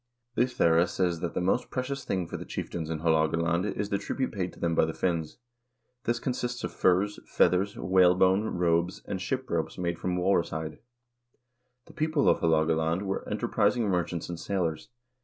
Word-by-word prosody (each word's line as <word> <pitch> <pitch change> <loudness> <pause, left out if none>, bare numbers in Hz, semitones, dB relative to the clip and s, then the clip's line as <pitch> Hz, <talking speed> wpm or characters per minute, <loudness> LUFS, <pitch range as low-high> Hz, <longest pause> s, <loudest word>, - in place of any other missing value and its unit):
Ohthere 120 -10 +3
1 85 - +4
says 90 -3 0
that 85 0 -4
the - - 0
most 95 +7 +1
precious 135 +2 -3
thing 95 -2 -1
for - - -7
the - - -5
chieftains 80 -2 -5
in 80 -1 -3
Haalogaland 85 +3 +1
is 105 0 -2
the 100 - 0
tribute 130 -1 -2
paid 90 -3 -3
them 85 -1 -1
by - - +4
the 80 - -4
Finns. 85 -4 -1 0.7
This 120 +1 +1
consists 125 0 -3
of - - -3
furs, 95 +3 +2
feathers, 90 +3 +2
whalebone, 95 +2 +4
robes, 85 0 +1
and 95 - -3
ship 130 +7 -2
ropes 85 -6 -2
made 85 -2 -2
from 90 -1 -1
walrus 90 -1 +2
hide. 80 -1 -5 1.1
The - - -16
people 155 -2 +1
of - - +4
Haalogaland 80 +2 +2
were 95 -1 -3
enter 110 +3 -2
prising 110 0 +2
merchants 90 -2 -1
and 85 -1 -6
sailors. 85 -6 -2
90 Hz, 175 wpm, -28 LUFS, 85-105 Hz, 1.1 s, 1